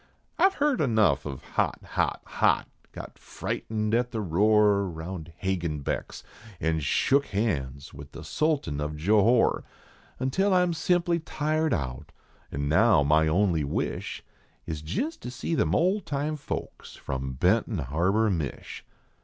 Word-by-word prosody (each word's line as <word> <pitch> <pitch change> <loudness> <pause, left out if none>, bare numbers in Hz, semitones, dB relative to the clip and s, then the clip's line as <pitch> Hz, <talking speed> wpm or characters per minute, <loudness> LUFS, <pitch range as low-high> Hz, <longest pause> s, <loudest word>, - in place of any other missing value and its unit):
I 375 +3 +6
ve 390 - -16
heerd 290 -2 +2
enough 110 - +2
of 70 -2 -7
Hot! - - -1
hot! - - -1
hot! - - +1 0.2
got - - -10
frightened 110 -1 -3
at 120 +1 +2
the 115 - -4
roar 105 +1 +3
Round 85 0 -7
Hagenbeck 85 -7 -2
s, - - -10 0.4
an 80 0 0
shook 135 - +2
hands 70 - -2
with 70 +1 -11
the - - -9
sultan 145 - -1
of 75 +1 -3
Johore, 105 +8 +3 0.5
Until 185 +10 +1
I 180 - +5
m 175 -1 0
simply 170 +1 +1
tired 155 0 -1
out, 65 -4 -3 0.4
an 70 +1 -2
now 90 +1 +4
my 75 +2 +3
only 85 -1 +2
wish 70 - -3 0.4
Is 80 -2 -5
jist 265 - -3
to - - -6
see 125 +6 -4
them - - +1
old 190 +5 +1
time 145 +2 -1
folks 150 - -6
from 65 0 -4
Benton 95 - +1
Harbor, 90 - +1
Mich." 80 -6 -4
100 Hz, 145 wpm, -27 LUFS, -, 0.5 s, I